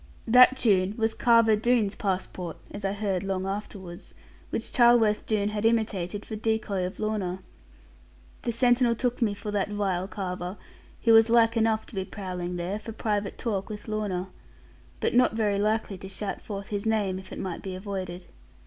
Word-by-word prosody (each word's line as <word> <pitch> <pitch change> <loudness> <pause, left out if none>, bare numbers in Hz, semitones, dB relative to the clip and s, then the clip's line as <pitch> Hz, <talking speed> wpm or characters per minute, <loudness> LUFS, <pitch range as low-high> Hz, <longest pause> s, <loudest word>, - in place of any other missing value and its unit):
That 250 +3 +7
tune 200 -4 +2
was 225 -1 +1
Carver 230 -2 +5
Doone's 220 -2 +2
passport 185 -3 -3
(as 205 - -7
I 195 0 0
heard 200 -3 -1
long 190 -1 -2
afterwards), 195 -2 -6 0.3
which - - -4
Charleworth 235 -3 +4
Doone 210 -2 +1
had 210 0 -3
imitated, 210 -4 0
for 220 - -5
decoy 215 -4 -1
of 185 - -10
Lorna. 195 -4 -2 1.0
The 235 - -1
sentinel 245 0 +3
took 245 +1 -1
me 210 -3 +2
for 205 +1 -5
that 205 -1 0
vile 195 -3 -1
Carver; 185 -1 -5 0.5
who 230 - +5
was 225 0 +7
like 230 0 +4
enough 220 -1 +2
to - - -16
be 190 -2 -2
prowling 180 -3 -5
there, 180 +4 -3
for 225 - -8
private 210 -2 -2
talk 205 -5 -2
with 210 -1 -7
Lorna; 200 -4 -2 0.7
but - - 0
not 245 -1 +4
very 210 -3 +1
likely 210 -2 0
to 190 - -8
shout 195 0 -5
forth 200 -2 -6
his 205 +1 -2
name, 205 -4 +1
if 190 - -13
it - - -6
might 180 -3 -4
be 190 -1 -5
avoided. 185 -2 -5
205 Hz, 175 wpm, -27 LUFS, 190-225 Hz, 1.0 s, That